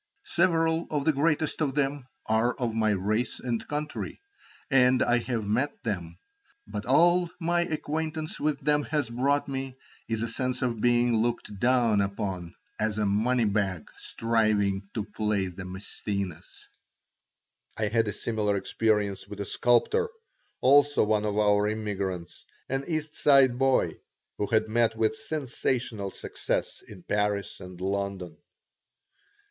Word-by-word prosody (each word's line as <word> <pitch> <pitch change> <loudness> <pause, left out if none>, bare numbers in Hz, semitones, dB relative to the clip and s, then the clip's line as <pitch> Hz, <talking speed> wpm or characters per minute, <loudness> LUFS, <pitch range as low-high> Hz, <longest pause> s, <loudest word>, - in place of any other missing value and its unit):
Several 165 - +2
of 145 -2 -1
the 160 - +4
greatest 155 +2 +1
of 140 -3 0
them 140 -2 -1 0.2
are 110 +3 +2
of 120 -4 -2
my 110 -1 +2
race 105 +4 0
and 120 -3 -3
country, 150 +1 -4 0.5
and 125 -1 +5
I 120 0 +3
have 115 -3 -2
met 125 +8 -1
them, 85 -6 -3 0.5
but 105 +2 -6
all 175 +6 +4
my 175 0 +1
acquaintance 155 -1 -3
with 150 -2 0
them 150 +1 +2
has 145 -6 -1
brought 140 +4 +1
me 135 -1 -4 0.3
is 115 0 -1
a - - -1
sense 125 +2 -2
of 120 -4 -1
being 120 -1 +3
looked 110 -3 -2
down 120 -4 +3
upon 95 -3 -3 0.2
as 105 0 0
a 105 - +1
money 115 +4 +2
bag 100 -5 -1
striving 105 -4 0
to 110 - -1
play 105 -2 -1
the 90 0 -7
Maæcenas. 95 -1 -5 1.3
I 110 - +1
had 115 0 +2
a - - 0
similar 105 -1 -1
experience 105 0 0
with 105 - -9
a 100 - -2
sculptor, 425 - +2 0.5
also 145 +2 +5
one 105 0 +1
of 105 0 -1
our 105 -1 +3
immigrants, 100 -5 -3 0.3
an 135 +1 -1
East 155 -2 -2
Side 135 -4 +5
boy 135 -1 +2 0.4
who 105 - 0
had 110 +1 +2
met 115 0 +2
with 110 -1 +2
sensational 130 - -2
success - - -3
in 95 -4 -13
Paris 105 -1 -1
and 90 -2 -10
London. 95 -1 -3
115 Hz, 140 wpm, -28 LUFS, 105-135 Hz, 1.3 s, and